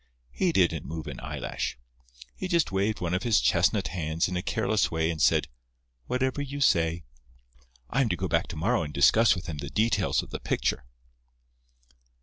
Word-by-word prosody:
He 185 -2 +1
didn't 85 - +2
move 80 +1 -5
an - - -7
eyelash. - - -4 0.6
He 185 - -4
just 170 - +1
waved 100 +2 0
one 85 -1 -1
of 90 - 0
his 115 -3 +3
chestnut - - +2
hands 80 -1 -1
in 90 - -4
a 90 - -1
careless 110 +1 0
way, 80 0 0
and 80 -2 -5
said, 65 - +3 0.6
'Whatever 130 +2 -1
you 145 0 -5
say.' 85 -9 +2 0.8
I 135 - 0
am 125 - +1
to 90 - +1
go 95 +3 -2
back 85 +1 +1
to - - -7
morrow 110 +10 +1
and 75 - -4
discuss 110 +12 +5
with 90 - -7
him 75 -3 -6
the 70 - -5
details 110 +10 +1
of - - -13
the - - -4
picture." - - -1
90 Hz, 185 wpm, -27 LUFS, 80-115 Hz, 0.8 s, discuss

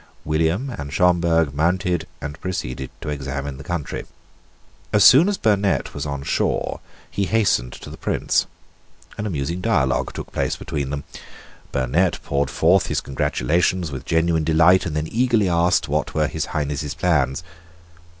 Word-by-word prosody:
William 80 - 0
and 70 -11 -6
Schomberg 85 -4 +2
mounted 90 +3 0
and 75 0 -6
proceeded 65 -8 -4
to 75 - -5
examine 70 -1 -4
the 70 - -9
country. 85 -2 -4 0.9
As 105 -1 +4
soon 150 - +8
as 205 - -1
Burnet 100 -3 +1
was - - -4
on 70 -1 -4
shore - - -1 0.3
he 100 - -1
hastened 100 - +1
to - - -10
the - - -9
Prince. - - 0 0.7
An 105 - -2
amusing 85 0 -3
dialogue 75 - +1
took - - -7
place - - -1
between 70 -2 -4
them. 70 0 -4 0.7
Burnet 70 +7 +1
poured 70 0 0
forth 90 -4 +3
his - - 0
congratulations 75 +5 0
with 65 -2 -6
genuine 80 -1 +1
delight, 80 +4 +4
and 75 - -4
then 75 +1 -1
eagerly 115 -4 +2
asked 85 0 +2
what - - -1
were 75 -1 +2
His - - -3
Highness's 75 0 -3
plans. 75 -4 +1
80 Hz, 150 wpm, -22 LUFS, 70-90 Hz, 0.9 s, soon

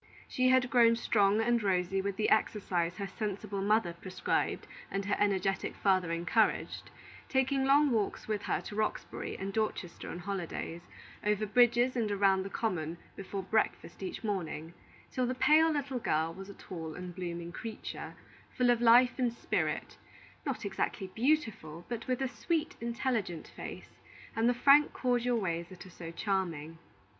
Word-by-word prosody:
She 255 0 +2
had 255 -1 +4
grown 235 -2 +6
strong 210 -2 +3
and 235 +1 +2
rosy 190 -1 +1
with 200 0 -2
the 215 +1 0
exercise 180 -5 +1
her 200 - -3
sensible 200 -1 -4
mother 205 -3 +2
prescribed 185 +2 -2 0.2
and 195 0 -2
her 205 - +1
energetic 195 -1 +1
father 185 -4 +2
encouraged, 175 +6 +1 0.4
taking 265 0 +2
long 285 +1 +5
walks 215 -4 -1
with 210 -2 -1
her - - 0
to 205 - -8
Roxbury 215 0 -3
and 195 +1 -4
Dorchester 215 -5 -2
on - - -5
holidays, 175 -2 -4 0.4
over 210 0 +1
bridges 240 +3 +4
and 225 -4 0
around 195 -1 +3
the 195 - -5
common 175 -7 -2 0.2
before 195 0 -5
breakfast 215 +2 -1
each 190 - -5
morning, 170 -6 -3 0.4
till 255 -1 0
the 255 - -1
pale 310 +5 +5
little 280 -4 -2
girl 160 -5 0
was 195 +2 -9
a 200 - -9
tall 160 -4 -7
and 180 0 -7
blooming 170 -1 -5
creature, 220 +4 -7 0.4
full 250 -2 +4
of 240 -1 +1
life 245 +2 +6
and 245 -2 +2
spirit, 235 - -2 0.5
not 260 -5 -3
exactly 190 -1 -2
beautiful, 220 - 0
but 235 -1 -5
with 255 +1 0
a - - +1
sweet, 325 +5 -2
intelligent 235 -8 -2
face, - - -9 0.4
and 225 +2 +3
the 245 - +2
frank, 285 +4 +6
cordial 245 -1 +1
ways 170 -5 -2
that 185 -1 -11
are 185 - -12
so 170 -1 -8
charming. 165 -4 -2
205 Hz, 160 wpm, -31 LUFS, 185-240 Hz, 0.5 s, grown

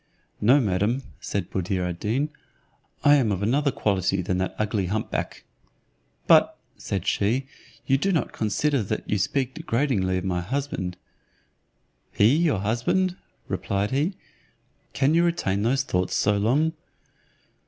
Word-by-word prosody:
"No, 125 +7 +6
madam," 105 +3 0 0.2
said 100 -4 -4
Buddir 95 0 -1
ad 85 -1 -5
Deen, 130 +8 0 0.7
"I 145 0 +7
am 120 -6 +1
of 100 0 -2
another 140 +7 +2
quality 95 -4 0
than 90 +1 -1
that 95 - -2
ugly 105 -3 -1
hump 110 +4 -2
back." - - -4 0.8
"But," - - +5 0.2
said 95 -2 -4
she, 115 +7 +1 0.4
"you 135 0 +2
do 195 +6 +1
not 160 -8 0
consider 130 +6 0
that 100 - -4
you 105 - 0
speak 130 +6 0
degradingly 115 - 0
of 90 - -3
my 90 -2 -1
husband." 100 -5 -3 1.1
"He 110 +7 +4
your 155 - +2
husband," 120 - 0 0.3
replied 100 +1 -2
he: 150 +8 0 0.8
"can 140 +3 +2
you 170 +1 +4
retain 135 - 0
those 130 +5 +1
thoughts 90 -7 -1
so 105 - +2
long? 135 +11 +2
110 Hz, 145 wpm, -25 LUFS, 95-140 Hz, 1.1 s, I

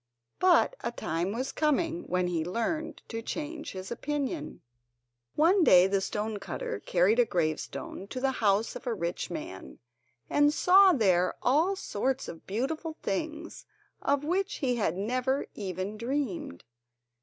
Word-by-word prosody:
But 370 +6 +4
a 235 - -2
time 170 -4 -2
was 250 +5 -3
coming 325 +3 0
when 180 0 +1
he 170 -3 -1
learned 235 - -3
to 225 -1 -4
change 305 +5 -5
his 190 +2 -7
opinion. 270 - -3 0.7
One 345 +5 +4
day 180 - +7
the 195 0 +1
stone 210 +2 -3
cutter 480 - -4
carried 190 - +2
a - - +8
gravestone 170 +2 -3
to 255 - -5
the 270 +1 +1
house 205 +1 +2
of - - -8
a 235 - 0
rich 170 -2 -3
man, 95 - -7 0.5
and 290 0 +4
saw 380 +5 +6
there 185 - +2
all 315 +10 +3
sorts 265 - -2
of 165 - -10
beautiful 310 - -3
things, 305 +10 -4 0.3
of 280 0 +1
which 375 +6 0
he 250 -3 0
had 180 -6 0
never 255 +6 0
even 190 +1 -4
dreamed. 235 - -3
235 Hz, 145 wpm, -29 LUFS, 190-300 Hz, 0.7 s, a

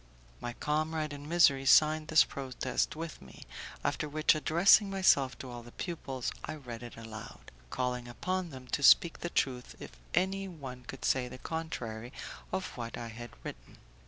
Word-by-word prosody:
My 120 0 -4
comrade 155 +2 -1
in 145 +1 -8
misery 140 -6 +5
signed 155 +1 +6
this 160 0 +7
protest 130 -1 -2
with 165 0 -6
me; 65 -1 -12 0.4
after 150 - -1
which, 155 +1 +4
addressing 170 +6 +5
myself 160 -9 +3
to 130 - -8
all 120 0 -7
the 120 0 -14
pupils, 135 -8 -4
I - - -4
read 125 -6 -8
it 120 -2 -9
aloud, 110 -1 -9 0.2
calling 125 -1 -2
upon 185 +9 -2
them 130 -3 -10
to - - -1
speak 165 +4 +6
the 175 - -3
truth 125 -6 -1
if - - -8 0.2
any 195 +2 +1
one 135 -8 -8
could 135 - -7
say 130 -2 +2
the 125 - -9
contrary 125 -8 -5 0.4
of 190 0 -1
what 115 -1 -5
I 120 -1 -5
had 120 +2 -8
written. - - -9
140 Hz, 170 wpm, -32 LUFS, 125-160 Hz, 0.4 s, this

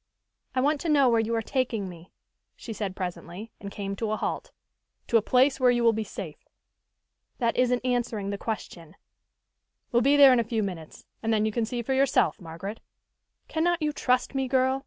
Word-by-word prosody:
"I 255 - +2
want 290 +1 +1
to 335 - -2
know 280 -4 +5
where 230 -1 +3
you 225 +1 0
are 225 - -1
taking 235 -6 -1
me," 175 0 -12 0.4
she 225 - -7
said 200 -3 -4
presently, 180 +3 -6
and 200 - -7
came 200 0 -5
to 225 0 -2
a 215 - -1
halt. - - -3 0.6
"To 235 - +5
a - - +3
place 260 +5 +3
where 255 -1 +5
you 240 -1 +2
will 230 -1 +5
be 220 0 -2
safe." 190 -6 -7 1.0
"That 235 -2 0
isn't 250 0 +1
answering 235 -5 -1
the 200 - -3
question." 175 -6 -6 1.0
"We'll 240 - +3
be 280 +4 +4
there 275 -2 +9
in 250 - +3
a - - +2
few 225 -1 -1
minutes, 170 -5 -7 0.2
and 225 - -1
then 215 -1 +2
you 220 - 0
can 230 +1 0
see 240 +1 -4
for 265 - -1
yourself, 265 -5 +2
Margaret. 175 +6 -7 0.7
Cannot 345 +2 +1
you 300 0 0
trust 250 -1 +1
me, 270 -1 -1
girl? 260 +1 +2
230 Hz, 200 wpm, -27 LUFS, 205-255 Hz, 1.0 s, there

